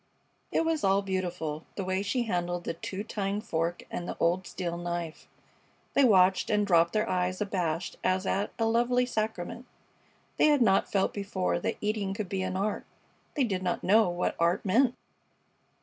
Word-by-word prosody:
It 330 Hz, -, +1 dB
was 325 Hz, -1 st, 0 dB
all 195 Hz, +1 st, +3 dB
beautiful, 175 Hz, -5 st, -3 dB
the 195 Hz, -, -3 dB
way 185 Hz, +1 st, 0 dB
she 220 Hz, +5 st, 0 dB
handled 175 Hz, -4 st, -2 dB
the -, -, -3 dB
two 190 Hz, +4 st, -5 dB
tined 205 Hz, -1 st, -3 dB
fork 170 Hz, -2 st, -1 dB
and 175 Hz, -, -4 dB
the -, -, -5 dB
old 175 Hz, +2 st, +1 dB
steel 175 Hz, -2 st, -4 dB
knife. 175 Hz, -2 st, -5 dB, 0.7 s
They 280 Hz, -, +4 dB
watched 190 Hz, -5 st, +4 dB
and 210 Hz, -1 st, +2 dB
dropped 170 Hz, -3 st, +4 dB
their 215 Hz, -, +1 dB
eyes 180 Hz, 0 st, 0 dB
abashed 180 Hz, -5 st, -2 dB
as 185 Hz, +1 st, +1 dB
at 200 Hz, +2 st, 0 dB
a 225 Hz, -, +1 dB
lovely 240 Hz, +2 st, +2 dB
sacrament. 220 Hz, 0 st, -3 dB, 0.7 s
They -, -, +5 dB
had 290 Hz, -4 st, +4 dB
not 195 Hz, -3 st, +3 dB
felt 195 Hz, -1 st, +1 dB
before 195 Hz, -3 st, -1 dB
that -, -, -2 dB
eating 210 Hz, -2 st, -1 dB
could 205 Hz, -3 st, -4 dB
be 190 Hz, -1 st, -2 dB
an 185 Hz, 0 st, -2 dB
art. 205 Hz, +2 st, -2 dB, 0.5 s
They 290 Hz, -, +2 dB
did 195 Hz, -6 st, -1 dB
not 180 Hz, -1 st, -2 dB
know 215 Hz, 0 st, +5 dB
what 175 Hz, 0 st, -1 dB
art 170 Hz, +4 st, +2 dB
meant. 240 Hz, +6 st, +3 dB
190 Hz, 180 wpm, -29 LUFS, 175-215 Hz, 0.7 s, They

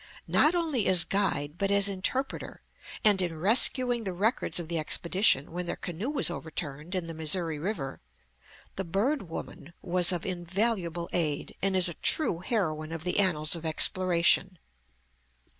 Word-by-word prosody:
Not 315 Hz, +4 st, +3 dB
only 310 Hz, -, 0 dB
as 180 Hz, -3 st, +4 dB
guide, 165 Hz, -6 st, -2 dB
but 195 Hz, -, 0 dB
as 200 Hz, 0 st, +3 dB
interpreter, 200 Hz, +8 st, -3 dB, 0.4 s
and 205 Hz, -3 st, +6 dB
in 170 Hz, -3 st, -2 dB
rescuing 240 Hz, -, +3 dB
the 190 Hz, -3 st, -4 dB
records 210 Hz, +1 st, 0 dB
of 170 Hz, -, -6 dB
the 170 Hz, 0 st, -2 dB
expedition 170 Hz, -1 st, +2 dB
when 175 Hz, +1 st, -5 dB
their -, -, -2 dB
canoe 180 Hz, -, -5 dB
was 290 Hz, -11 st, +2 dB
overturned 160 Hz, 0 st, -6 dB
in 180 Hz, -2 st, -2 dB
the 165 Hz, -, -7 dB
Missouri 160 Hz, 0 st, -1 dB
River, 155 Hz, -6 st, -5 dB, 0.8 s
the 195 Hz, -, -2 dB
"Bird 195 Hz, -, -1 dB
Woman" 165 Hz, 0 st, -8 dB
was 180 Hz, 0 st, +3 dB
of 175 Hz, -3 st, -3 dB
invaluable 175 Hz, -1 st, -2 dB
aid, 155 Hz, -5 st, -1 dB
and 195 Hz, 0 st, 0 dB
is 185 Hz, -1 st, +3 dB
a 170 Hz, -, -3 dB
true 180 Hz, -, +2 dB
heroine 160 Hz, -7 st, -2 dB
of 165 Hz, -1 st, -6 dB
the 180 Hz, +3 st, 0 dB
annals 160 Hz, -5 st, +1 dB
of 165 Hz, -, -8 dB
exploration. 180 Hz, +3 st, +3 dB
180 Hz, 160 wpm, -28 LUFS, 165-200 Hz, 0.8 s, and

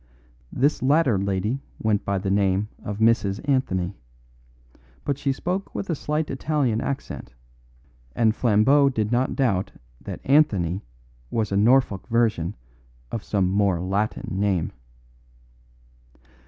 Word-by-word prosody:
This 145 Hz, +4 st, +1 dB
latter 135 Hz, -6 st, +3 dB
lady 100 Hz, +7 st, -1 dB, 0.2 s
went 105 Hz, -2 st, 0 dB
by 100 Hz, 0 st, -1 dB
the 95 Hz, 0 st, -2 dB
name 100 Hz, +1 st, +1 dB
of 105 Hz, 0 st, -4 dB
Mrs. 110 Hz, -2 st, +2 dB
Anthony, 100 Hz, -10 st, 0 dB, 1.1 s
but 140 Hz, -1 st, -1 dB
she 140 Hz, -1 st, 0 dB
spoke 180 Hz, +8 st, -3 dB
with 195 Hz, -, -3 dB
a -, -, +2 dB
slight 150 Hz, +2 st, -2 dB
Italian 135 Hz, -5 st, 0 dB
accent, 135 Hz, -, -5 dB, 0.8 s
and 110 Hz, -2 st, +3 dB
Flambeau 125 Hz, +6 st, +4 dB
did 110 Hz, -4 st, -1 dB
not 125 Hz, +2 st, +1 dB
doubt 105 Hz, -9 st, 0 dB, 0.3 s
that -, -, -7 dB
Anthony 100 Hz, -, +3 dB, 0.5 s
was 110 Hz, -3 st, -1 dB
a -, -, 0 dB
Norfolk 110 Hz, -2 st, +3 dB
version 110 Hz, -7 st, +1 dB, 0.6 s
of 115 Hz, -, -4 dB
some 95 Hz, -3 st, +1 dB
more 100 Hz, -2 st, +2 dB
Latin 95 Hz, +1 st, -2 dB
name. 95 Hz, -5 st, +1 dB
110 Hz, 125 wpm, -24 LUFS, 100-135 Hz, 1.1 s, Flambeau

